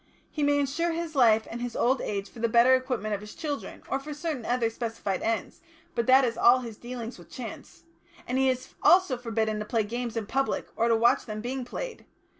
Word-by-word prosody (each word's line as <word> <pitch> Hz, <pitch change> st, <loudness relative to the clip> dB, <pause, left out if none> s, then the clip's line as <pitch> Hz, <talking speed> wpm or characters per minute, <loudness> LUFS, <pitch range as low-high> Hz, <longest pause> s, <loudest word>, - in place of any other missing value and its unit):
He 305 Hz, -, -4 dB
may 290 Hz, 0 st, +3 dB
insure 300 Hz, +5 st, 0 dB
his 335 Hz, -1 st, -4 dB
life 225 Hz, -5 st, +4 dB
and 235 Hz, +1 st, -5 dB
his 245 Hz, -1 st, -4 dB
old 260 Hz, +2 st, +2 dB
age 200 Hz, -1 st, -3 dB
for 235 Hz, -, -14 dB
the 230 Hz, 0 st, +1 dB
better 235 Hz, +3 st, +6 dB
equipment 250 Hz, -5 st, 0 dB
of 200 Hz, -, -2 dB
his 210 Hz, 0 st, -10 dB
children, 295 Hz, -3 st, -5 dB
or 270 Hz, -, -1 dB
for 295 Hz, +2 st, -7 dB
certain 295 Hz, -6 st, -3 dB
other 240 Hz, -2 st, +1 dB
specified 225 Hz, -5 st, -3 dB
ends, 225 Hz, +4 st, -2 dB, 0.3 s
but 235 Hz, -6 st, -1 dB
that 260 Hz, +1 st, +7 dB
is 230 Hz, -1 st, -2 dB
all 255 Hz, +2 st, +6 dB
his 230 Hz, -3 st, -7 dB
dealings 240 Hz, -3 st, -7 dB
with 170 Hz, -1 st, -15 dB
chance. 230 Hz, +6 st, -9 dB, 0.4 s
And 255 Hz, +2 st, -1 dB
he 265 Hz, 0 st, +4 dB
is 255 Hz, 0 st, -3 dB
also 365 Hz, -7 st, +5 dB
forbidden 220 Hz, -3 st, -1 dB
to 210 Hz, -, -4 dB
play 225 Hz, 0 st, +1 dB
games 235 Hz, +2 st, -4 dB
in 225 Hz, -, -2 dB
public 270 Hz, +5 st, -1 dB
or 230 Hz, -, +2 dB
to 230 Hz, -, +4 dB
watch 230 Hz, +2 st, +3 dB
them 215 Hz, -1 st, -4 dB
being 250 Hz, +3 st, -3 dB
played. -, -, -6 dB
240 Hz, 225 wpm, -27 LUFS, 225-265 Hz, 0.4 s, that